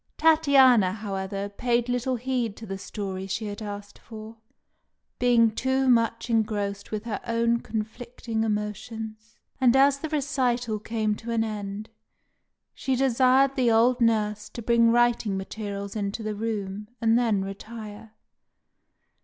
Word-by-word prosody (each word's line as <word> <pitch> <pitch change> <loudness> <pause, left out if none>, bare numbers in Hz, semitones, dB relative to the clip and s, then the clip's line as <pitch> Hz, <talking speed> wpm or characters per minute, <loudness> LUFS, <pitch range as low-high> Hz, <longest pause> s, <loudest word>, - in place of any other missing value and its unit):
Tatiana, 275 -11 +5
however, 195 -1 -4
paid 235 +3 0
little 245 +1 -1
heed 245 -3 -2
to 225 - -9
the 195 -2 -6
story 195 -2 -5
she 195 +3 -3
had 205 +1 -6
asked 205 -1 -7
for, 220 0 -10 0.8
being 235 -2 +4
too 260 +4 0
much 230 -2 +2
engrossed 210 -3 -1
with 215 -1 -4
her 230 -3 -4
own 235 0 +1
conflicting 225 0 -4
emotions; 215 +1 -4 0.2
and 255 -1 +4
as 275 +1 +5
the 315 - -4
recital 250 -6 0
came 215 0 -1
to 225 +3 -8
an 230 -1 +1
end, 210 -1 -5 0.9
she 265 -1 -1
desired 265 +1 +3
the 255 -4 +2
old 240 +3 +3
nurse 215 -2 +1
to 235 - -8
bring 230 0 +4
writing 240 -4 +2
materials 200 0 -5
into 205 +1 -3
the 215 0 -2
room, 210 -2 -4
and 225 -1 +3
then 220 -5 +2
retire. 215 +2 -9
225 Hz, 135 wpm, -26 LUFS, 210-245 Hz, 0.9 s, Tatiana